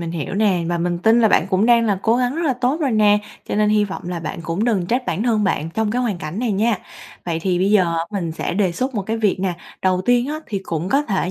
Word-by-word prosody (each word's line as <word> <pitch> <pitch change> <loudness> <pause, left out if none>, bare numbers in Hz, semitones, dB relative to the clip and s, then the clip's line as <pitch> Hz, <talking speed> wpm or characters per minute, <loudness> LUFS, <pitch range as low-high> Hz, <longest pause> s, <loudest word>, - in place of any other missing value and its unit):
mình 170 -1 -4
hiểu 165 +1 -4
nè. 195 -4 +2
Và 175 - -1
mình 175 0 -1
tin 225 +5 +4
là 220 - +5
bạn - - +3
cũng 190 +3 +2
đang 235 -1 +4
là 200 -3 +1
cố 225 +1 +3
gắng 250 +1 0
rất 340 - -1
là 275 - +3
tốt 255 +6 -1
rồi 280 - +1
nè, 210 -2 +4 0.3
cho - - -2
nên 210 0 +2
hi 210 0 +3
vọng 195 -1 -6
là 175 -2 -4
bạn 160 - -5
cũng 170 +6 -2
đừng 200 -7 +1
trách 250 +4 -1
bản 205 - -1
thân 225 -3 +1
bạn 165 -4 -1
trong 220 -1 0
cái 250 +3 0
hoàn 210 -8 -1
cảnh 155 +5 -6
này 235 -2 0
nha. 210 +1 +1 0.5
Vậy 170 -2 -2
thì 180 -2 +1
bây 190 +2 +2
giờ 180 -5 +3
mình 180 -6 -3
sẽ 165 - -3
đề 190 -2 +1
xuất 255 +9 -3
một 205 - -1
cái 220 +4 -2
việc 210 -4 0
nè. 190 -1 0 0.3
Đầu 185 -1 +1
tiên 245 +3 +2
á 305 +2 -4
thì 205 - -3
cũng 170 0 -3
có 275 +7 +2
thể 195 -8 -1
205 Hz, 290 wpm, -20 LUFS, 180-235 Hz, 0.5 s, là